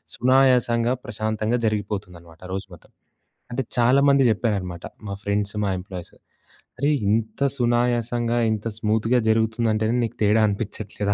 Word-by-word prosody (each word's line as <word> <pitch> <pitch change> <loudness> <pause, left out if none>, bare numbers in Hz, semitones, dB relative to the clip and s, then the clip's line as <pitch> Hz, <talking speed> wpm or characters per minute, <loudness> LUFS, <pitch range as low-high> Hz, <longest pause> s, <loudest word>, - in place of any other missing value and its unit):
సునాయాసంగా, 125 -2 +3
ప్రశాంతంగా 110 +1 -1
జరిగిపోతుందనమాట 95 -6 -4
రోజు 95 +1 -4
మొత్తం. 85 - -16 0.6
అంటే 130 +2 -1
చాలామంది 140 +3 +4
జెప్పారనమాట, 100 -6 -2 0.2
మా 100 - -4
ఫ్రెండ్సు, 100 0 -1
మా - - 0
ఎంప్లాయీసు. 90 -2 -9 0.6
"అరేయ్! 145 +2 +2
ఇంత 110 +4 -1 0.2
సునాయాసంగా, 120 -1 +1
ఇంత 110 0 -2
స్మూత్‌గా 110 +3 +2
జరుగుతుందంటేనే 110 0 +1
నీకు 115 +1 -4
తేడా 105 +2 +4
అనిపించట్లేదా?" 100 0 -3
110 Hz, 115 wpm, -23 LUFS, 100-120 Hz, 0.6 s, చాలామంది